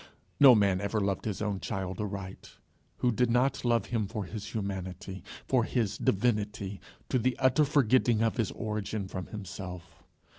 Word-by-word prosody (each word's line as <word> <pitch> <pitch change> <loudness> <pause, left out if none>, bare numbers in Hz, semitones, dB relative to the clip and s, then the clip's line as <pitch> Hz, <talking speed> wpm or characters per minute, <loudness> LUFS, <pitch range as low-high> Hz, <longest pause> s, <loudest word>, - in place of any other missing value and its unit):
No 135 -4 +9
man 100 -3 +3
ever 100 +2 0
loved 100 -2 -1
his 105 -1 -2
own 100 -2 -1
child 95 0 -4
aright 100 -2 -6 0.4
who 125 - +2
did 125 +1 +1
not 125 +3 +2
love 115 -4 +2
him 115 -4 -1
for 105 +1 -4
his 105 +3 -7
humanity, 95 -3 -5 0.2
for 125 -3 +3
his 115 -3 0
divinity, 105 -2 0 0.3
to 130 - +2
the 125 +1 0
utter 130 +3 +4
forgetting 130 -5 +3
of 115 +1 0
his 115 -5 +1
origin 105 -1 -3
from 95 -1 -6
himself. 95 -3 -8
105 Hz, 160 wpm, -30 LUFS, 95-120 Hz, 0.4 s, No